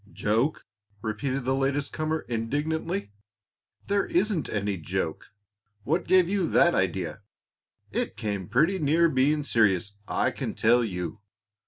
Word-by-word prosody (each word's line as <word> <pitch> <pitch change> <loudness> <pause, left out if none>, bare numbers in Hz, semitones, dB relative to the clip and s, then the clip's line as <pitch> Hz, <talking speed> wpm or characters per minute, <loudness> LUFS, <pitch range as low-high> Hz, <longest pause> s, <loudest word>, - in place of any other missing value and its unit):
"Joke!" 115 +9 0 0.4
repeated 125 +5 -2
the 130 - +2
latest 140 +1 0
comer, 155 0 -1
indignantly. 150 - -2 0.7
"There 200 0 +1
isn't 180 - 0
any 100 -1 -1
joke. 80 - -4 0.5
What 160 - 0
gave 185 -2 +5
you 190 -2 0
that 175 - +5
idea? 95 0 -1 0.7
It - - -2
came 100 -4 -3
pretty 160 - +2
near 160 +3 +3
being 150 +2 +2
serious, 105 -6 +2 0.2
I - - +1
can - - -4
tell 120 +2 +4
you. 95 -1 -4
135 Hz, 130 wpm, -27 LUFS, 110-160 Hz, 0.7 s, gave